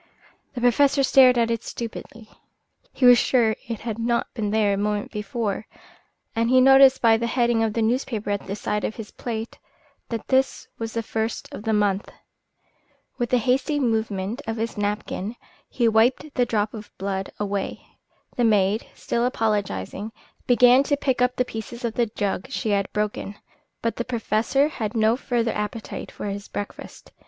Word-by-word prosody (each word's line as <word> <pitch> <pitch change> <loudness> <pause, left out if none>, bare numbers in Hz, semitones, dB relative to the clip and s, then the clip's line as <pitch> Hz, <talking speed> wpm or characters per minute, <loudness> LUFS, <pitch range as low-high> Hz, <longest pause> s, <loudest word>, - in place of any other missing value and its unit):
The 245 - -4
Professor 275 +3 +4
stared 255 -2 +6
at 230 -1 +2
it 230 0 -2
stupidly. 230 -1 -7 0.6
He 260 - 0
was 245 -1 +8
sure 230 -4 +2
it 230 -3 -5
had 225 -1 -4
not 235 +1 -1
been 215 -4 -2
there 210 -1 +2
a - - +1
moment 205 +1 -2
before, 210 0 -3 0.7
and 230 +1 +1
he 255 +1 +6
noticed 270 0 +7
by 225 -1 +6
the 235 +1 -2
heading 235 -1 +2
of 220 -1 0
the 230 - 0
newspaper 225 -3 -1
at 200 -1 -3
the 195 - -3
side 210 0 -2
of 215 - -2
his 220 -2 -8
plate 225 -1 -5 0.5
that 230 -2 -4
this 265 0 +1
was 225 -1 -4
the 230 - -2
first 220 +1 -3
of - - -6
the 220 - +1
month. 205 -1 +1 1.1
With 240 -1 -1
a 250 - +5
hasty 260 +5 +1
movement 220 -2 -1
of 225 0 -2
his 225 +1 -3
napkin 205 +1 -3 0.3
he 240 -2 +1
wiped 245 +7 +2
the 245 -1 +1
drop 210 -2 0
of 215 -2 -8
blood 195 0 -3
away. 200 -1 -3 0.5
The 245 - +2
maid, 210 -1 +2
still 235 - -1
apologising, 210 - -1 0.3
began 245 +1 +6
to 285 +1 0
pick 260 -3 0
up 250 0 +2
the 250 - +1
pieces 235 +2 -6
of 230 - -2
the 235 0 +1
jug 205 +1 -3
she 230 -5 -2
had 200 -1 0
broken; 210 -1 -3 0.5
but 230 - -1
the 240 - -1
Professor 240 +3 +1
had 230 -7 -4
no 220 +1 +3
further 240 -3 -1
appetite 210 +1 -5
for - - -8
his 200 0 -5
breakfast. 205 - -8
225 Hz, 175 wpm, -24 LUFS, 210-245 Hz, 1.1 s, was